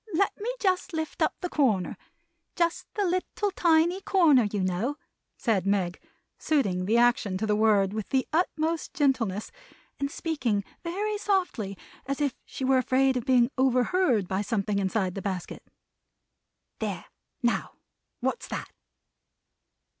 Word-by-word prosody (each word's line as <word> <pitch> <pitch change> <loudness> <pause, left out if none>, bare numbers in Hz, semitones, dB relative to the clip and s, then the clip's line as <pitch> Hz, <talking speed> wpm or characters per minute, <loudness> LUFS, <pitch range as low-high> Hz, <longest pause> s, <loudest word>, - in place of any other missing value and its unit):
Let 395 +4 +2
me 465 +4 -1
just 375 -2 0
lift 315 -1 -4
up - - +2
the 360 - -1
corner; 215 - +1 0.6
just 340 -1 -1
the 410 -2 +1
lit 365 0 +1
tle 410 -1 0
ti 325 -3 +4
ny 355 +3 -2
cor 345 -6 +4
ner, 250 -4 +6
you 205 -2 -1
know," 195 +11 -1 0.4
said 200 -6 0
Meg, 190 -3 0 0.4
suiting 200 -12 +1
the 225 +3 +3
action 235 -5 +3
to 215 - -1
the 210 -1 +2
word 210 -3 +3
with 215 -2 -4
the 265 -1 +1
utmost 325 0 0
gentleness, 240 - 0 0.5
and 280 - -1
speaking 260 -11 -1 0.2
very 410 +5 -2
softly, 355 - -1 0.3
as 275 +1 -2
if 285 -3 +1
she 265 - -5
were 265 0 +4
afraid 260 +1 +2
of 245 - -2
being 250 -1 +4
overheard 255 - +2
by 190 +2 -1
something 205 -1 -1
inside 190 -1 0
the 195 - -5
basket; 190 -3 -4 1.2
"there. - - -3 0.4
Now. 240 - 0 0.5
What's - - -2
that!" - - -5
255 Hz, 150 wpm, -27 LUFS, 205-330 Hz, 1.2 s, ner